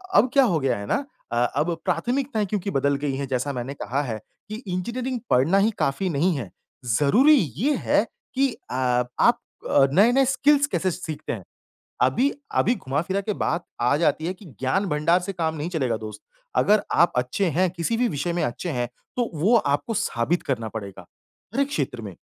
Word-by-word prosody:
अब 255 - +6
क्या 275 - +6
हो 180 -10 +2
गया 135 -5 0
है 100 - -6
ना 280 - 0 0.3
अ, 120 - -1 0.2
अब 170 +3 +1
प्राथमिकताएँ 250 -3 0
क्योंकि 200 0 -2
बदल 140 +1 +1
गई 140 -2 0
हैं, 140 0 -3
जैसा 130 +2 -1
मैंने 125 +2 -4
कहा 140 0 -2
है 110 -4 -4 0.3
कि 215 - -4
इंजीनियरिंग 235 +8 -3
पढ़ना 145 +10 +4
ही 210 +3 +3
काफ़ी 140 +8 0
नहीं 165 +2 +1
है। 115 -8 -5 0.5
ज़रूरी 240 - +5 0.2
ये 280 - +2
है - - +2 0.3
कि 275 +1 +3 0.2
अ, - - -3 0.5
आप - - +4 0.5
नए-नए 240 - +5
स्किल्स 285 +2 +3
कैसे 190 -9 0
सीखते 160 -3 -5
हैं। 105 -6 -7 0.6
अभी 190 - +3 0.2
अभी, 240 - +3
घुमा 140 - -2
फिरा 190 +3 -1
के 210 +2 -2
बात 170 +2 0 0.2
आ 125 +4 +3
जाती 155 0 +1
है 180 - -1
कि 195 - -16 0.2
ज्ञान 190 +10 +1
भंडार 165 +3 +2
से 180 +2 -4
काम 165 -3 -1
नहीं 155 +2 -3
चलेगा 135 -10 0
दोस्त। 110 -1 -8 0.4
अगर 210 0 +4
आप 170 0 +4
अच्छे 125 +10 0
हैं 185 0 +3
किसी 170 +6 -2
भी 245 +1 +2
विषय 150 +1 -2
में 170 - -1
अच्छे 120 +9 -3
हैं, 120 -4 -1 0.3
तो 240 -2 0
वो 180 +10 +3
आपको 145 +3 0
साबित 160 - 0
करना 115 -5 -2
पड़ेगा। 100 -4 -7 0.5
हर 270 - +1
एक 280 - +2
क्षेत्र 130 - -3
में, 100 -3 -7
170 Hz, 195 wpm, -24 LUFS, 135-215 Hz, 0.6 s, अब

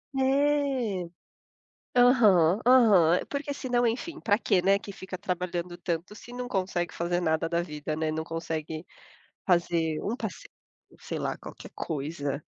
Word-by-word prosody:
É. 270 -6 +1 0.9
Aham, 215 -7 +5
aham, 205 -10 +6
porque 285 0 -3
se 265 - -6
não, 245 -1 +2
enfim, 245 +9 -3
para 205 -2 +2
quê, 190 -5 +2
né, 195 +1 +4
que 200 - -9
fica 190 -1 -7
trabalhando 180 -2 -3
tanto 175 +3 -3
se 240 +3 -12
não 250 0 -5
consegue 185 -4 -1
fazer 175 +1 -1
nada 160 -1 0
da 170 +1 0
vida, 150 -2 -5
né? 155 0 -1
Não 160 - -2
consegue 160 -1 -4 0.6
fazer 170 -3 +1
um 225 - -2
passeio, - - -6 0.5
sei - - -5
lá, - - -2
qualquer - - -11
coisa. 145 -1 -3
180 Hz, 150 wpm, -28 LUFS, 165-240 Hz, 0.9 s, aham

